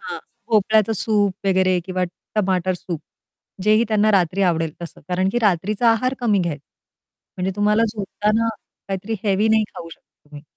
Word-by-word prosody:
हां, - - -6 0.3
भोपळ्याचं 220 0 +3
सूप 205 -2 +1
वगैरे 185 -1 +3
किंवा 185 -1 -1 0.3
टमाटर 185 -3 +1
सूप 170 -3 -6 0.6
जेही 215 +3 +4
त्यांना 215 0 +3
रात्री 190 +1 +2
आवडेल 165 -3 +1
तसं. 170 - -9
कारण 185 +1 +1
की 240 - +1
रात्रीचा 210 +4 +2
आहार 255 +3 +1
कमी 215 -5 +2
घ्यायचं. 155 -6 -3 0.7
म्हणजे 185 +1 -1
तुम्हाला 210 +2 +3
झोपताना 215 +2 0 0.4
काहीतरी 195 +3 -3
हेवी 205 +2 +2
नाही 220 0 +3
खाऊ 165 - -8
शकता 150 - -19
तुम्ही. 145 0 -10
195 Hz, 155 wpm, -21 LUFS, 180-215 Hz, 0.7 s, जेही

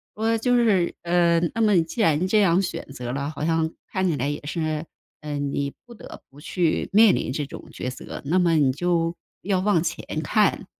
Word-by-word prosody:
说， 225 +1 +1
就 245 +2 +2
是， 205 -7 +2
呃， 170 -1 +3 0.2
“那 230 - 0
么 210 -5 +4
既 165 +8 -4
然 165 -2 +2
这 210 +2 +3
样 180 -1 +4
选 185 - -4
择 125 -2 -5
了， 140 +1 -2
好 150 0 -4
像 160 -1 +1 0.2
看 190 -1 0
起 155 - -1
来 135 +2 -1
也 145 - -3
是， 155 0 -2 0.4
嗯， 145 -2 -3
你 140 0 -2
不 240 - -13
得 230 - -12
不 140 +2 -16
去 170 0 -1
面 215 0 +6
临 - - -2
这 145 +2 -2
种 140 - -11
抉 125 - -4
择， 130 - -8
那 165 +6 +1
么 170 -2 +3
你 135 -4 +3
就 170 +2 0 0.3
要 190 -1 +1
望 200 -4 +2
前 170 0 -4 0.2
看。 205 +5 +1
170 Hz, 220 characters per minute, -24 LUFS, 150-195 Hz, 0.4 s, 面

